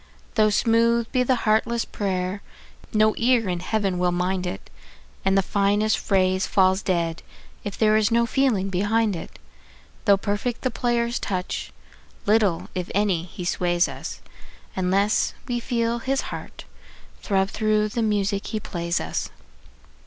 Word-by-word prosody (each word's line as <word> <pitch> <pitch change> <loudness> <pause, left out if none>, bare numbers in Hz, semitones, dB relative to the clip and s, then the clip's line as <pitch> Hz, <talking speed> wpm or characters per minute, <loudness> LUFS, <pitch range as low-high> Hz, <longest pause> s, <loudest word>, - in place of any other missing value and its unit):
Though 215 -2 +4
smooth 230 +2 +2
be 255 - +2
the 255 +1 +3
heartless 230 +2 +2
prayer, 190 -1 -2 0.5
no 215 0 +4
ear 235 -2 +3
in 175 -1 -1
Heaven 195 -1 -1
will 180 0 +2
mind 180 +1 -1
it, 95 - -7 0.5
And 195 0 +3
the 195 - +3
finest 205 +3 +2
phrase 185 -1 +1
falls 190 0 +3
dead 170 -3 -1 0.4
if 205 - -5
there 215 -1 +4
is 215 -1 +3
no 235 0 +3
feeling 230 -6 +1
behind 205 +2 +1
it. 165 - -8 0.7
Though 200 -3 +6
perfect 205 +5 -2
the 255 - 0
player's 235 0 0
touch, 185 -1 -3 0.5
little, 205 -5 +2
if 180 -1 -4
any, 195 -5 +1
he 180 0 -8
sways 175 0 +1
us, - - -7 0.5
Unless 195 +3 +1
we 245 -2 -1
feel 235 -1 -1
his 270 +3 0
heart - - -8 0.6
throb 195 -1 +1
through 215 -1 +1
the 230 +3 -2
music 205 -2 0
he 215 - -2
plays 170 -3 -2
us. - - -3
205 Hz, 145 wpm, -24 LUFS, 185-230 Hz, 0.7 s, Though